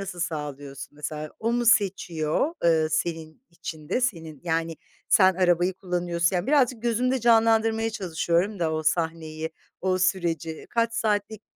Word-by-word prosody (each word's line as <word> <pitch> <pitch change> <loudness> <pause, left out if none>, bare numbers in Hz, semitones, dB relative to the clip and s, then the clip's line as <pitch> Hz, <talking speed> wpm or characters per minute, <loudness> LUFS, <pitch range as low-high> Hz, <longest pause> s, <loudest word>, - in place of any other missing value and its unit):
nasıl 190 -3 -6
sağlıyorsun? 145 -5 -5
Mesela 150 0 -5
o 230 +1 0
mu 240 0 0
seçiyor, 190 - +2
ııı, 160 -2 +3
senin 160 +5 -3
için 160 -2 -8
de 245 - +1
senin 165 - -3
yani, 165 -1 -1 0.3
sen 190 -2 +5
arabayı 175 0 +2
kullanıyorsun, 175 -1 -1
yani, 175 - -2
birazcık 255 -5 +2
gözümde 250 +2 +1
canlandırmaya 225 -1 +3
çalışıyorum 180 +1 -1
da 160 -2 0
o 155 0 -1
sahneyi, 160 -1 -1 0.3
o 185 0 +1
süreci. 170 -4 -1
Kaç 230 -1 +1
saatlik? 210 -1 -1
175 Hz, 140 wpm, -25 LUFS, 160-220 Hz, 0.3 s, sen